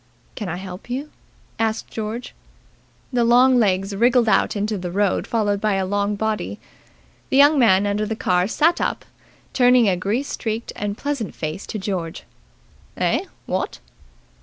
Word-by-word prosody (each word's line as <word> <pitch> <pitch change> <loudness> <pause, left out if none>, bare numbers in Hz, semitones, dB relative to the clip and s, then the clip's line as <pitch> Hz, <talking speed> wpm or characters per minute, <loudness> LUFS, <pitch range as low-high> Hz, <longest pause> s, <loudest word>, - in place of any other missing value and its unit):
"Can 210 -4 -5
I 165 - -3
help 185 +3 -9
you?" 275 +5 -4 0.5
asked 225 0 -1
George. 220 +2 -5 0.8
The 240 -1 +3
long 250 +2 +5
legs 195 -2 +1
wriggled 240 +2 +3
out 215 - +2
into 210 +1 -1
the 180 -2 -4
road 200 +2 0
followed 205 -3 0
by 215 -1 +1
a 190 -1 0
long 205 +2 0
body. 210 - -2 0.7
The 265 - +2
young 290 +1 +6
man 205 -5 +5
under 205 +1 0
the 220 - -2
car 180 -3 +1
sat 325 +9 +2
up, - - -2 0.5
turning 250 -2 +5
a 190 - +3
grease 210 +10 -2
streaked 225 0 -4
and 205 0 -3
pleasant 280 - -3
face 155 +4 -5
to - - -4
George. 185 -5 -4 0.7
"Eh, - - +1 0.2
what?" - - -2
215 Hz, 160 wpm, -22 LUFS, 195-240 Hz, 0.8 s, young